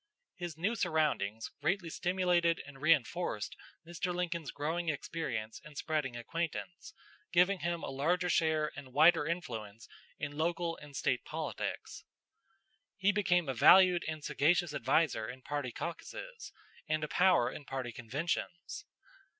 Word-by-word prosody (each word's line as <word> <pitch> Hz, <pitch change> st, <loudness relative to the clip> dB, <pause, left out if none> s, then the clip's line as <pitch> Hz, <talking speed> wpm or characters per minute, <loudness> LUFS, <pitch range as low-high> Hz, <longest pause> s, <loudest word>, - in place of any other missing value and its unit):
His 175 Hz, -4 st, -6 dB
new 190 Hz, +8 st, 0 dB
surroundings 150 Hz, -, 0 dB
greatly 175 Hz, +1 st, 0 dB
stimulated 175 Hz, -2 st, +2 dB
and 135 Hz, -2 st, -12 dB
reinforced 155 Hz, -5 st, +1 dB, 0.3 s
Mr. 175 Hz, +2 st, -3 dB
Lincoln's 170 Hz, -4 st, -2 dB
growing 160 Hz, +3 st, -2 dB
experience 140 Hz, -7 st, -3 dB
and 150 Hz, -1 st, -12 dB
spreading 150 Hz, -7 st, -1 dB
acquaintance, 165 Hz, +7 st, -4 dB, 0.4 s
giving 180 Hz, +2 st, +4 dB
him 170 Hz, +1 st, -2 dB
a -, -, -4 dB
larger 175 Hz, +7 st, +1 dB
share 160 Hz, -3 st, +2 dB
and 135 Hz, -3 st, -10 dB
wider 155 Hz, +1 st, +6 dB
influence 115 Hz, -, -5 dB, 0.3 s
in 145 Hz, -1 st, -4 dB
local 170 Hz, +1 st, 0 dB
and 145 Hz, -2 st, -12 dB
State 125 Hz, -1 st, 0 dB
politics. -, -, -4 dB, 0.9 s
He 195 Hz, +1 st, +3 dB
became 180 Hz, -5 st, +2 dB
a 135 Hz, -, 0 dB
valued 180 Hz, +7 st, +7 dB
and 155 Hz, -2 st, -4 dB
sagacious 155 Hz, +3 st, +2 dB
adviser 130 Hz, -4 st, +1 dB
in 125 Hz, +1 st, -9 dB
party 145 Hz, -4 st, -3 dB
caucuses, 455 Hz, -, -7 dB, 0.4 s
and 155 Hz, 0 st, +1 dB
a -, -, -1 dB
power 175 Hz, -9 st, +4 dB
in 145 Hz, -, -8 dB
party 130 Hz, -3 st, -4 dB
conventions. 150 Hz, +9 st, -4 dB
160 Hz, 135 wpm, -33 LUFS, 140-175 Hz, 0.9 s, valued